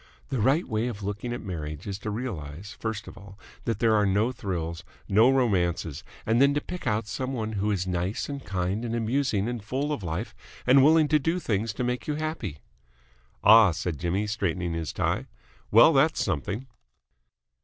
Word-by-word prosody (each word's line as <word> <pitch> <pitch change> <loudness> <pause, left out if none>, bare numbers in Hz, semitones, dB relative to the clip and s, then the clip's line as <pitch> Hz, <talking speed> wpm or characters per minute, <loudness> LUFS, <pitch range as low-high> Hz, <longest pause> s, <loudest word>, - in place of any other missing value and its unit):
The 130 - -1
right 135 - +2
way 110 +2 -1
of 105 -4 -5
looking 105 +4 -4
at 120 - -4
marriage 75 -5 -5
is 100 -1 -4
to 105 - -4
realise, 100 - -5
first 110 -2 -4
of - - -10
all, 100 0 -13 0.3
that 115 - 0
there 115 -2 +3
are 105 -1 +4
no 105 +5 +2
thrills, 85 -8 -4 0.2
no 110 +5 +5
romances, 90 - +1 0.2
and 115 +3 +3
then 140 +1 +5
to - - +2
pick 180 -1 -7
out 105 -1 +1
some 130 +5 -3
one 110 -3 -2
who 105 0 -1
is 95 -4 0
nice 90 +2 -2
and 140 -2 -6
kind 95 +3 -2
and 115 -1 -2
amusing 115 -2 0
and 120 -3 -4
full 135 +7 -2
of 140 - -4
life 90 +5 -4 0.3
and 130 +2 +6
willing 155 +1 +5
to 150 - +4
do 165 +5 0
things 110 - -1
to 125 - -3
make 125 0 -2
you 150 - 0
happy." 150 - -4 0.8
"Ah!" 110 -1 +8
said 80 -2 -3
Jimmy, 90 +4 0
straightening 90 -5 -1
his 80 -3 -3
tie, - - -1 0.4
"Well, - - +7
that's - - +3
something." 100 - -2
105 Hz, 190 wpm, -27 LUFS, 95-125 Hz, 0.8 s, Ah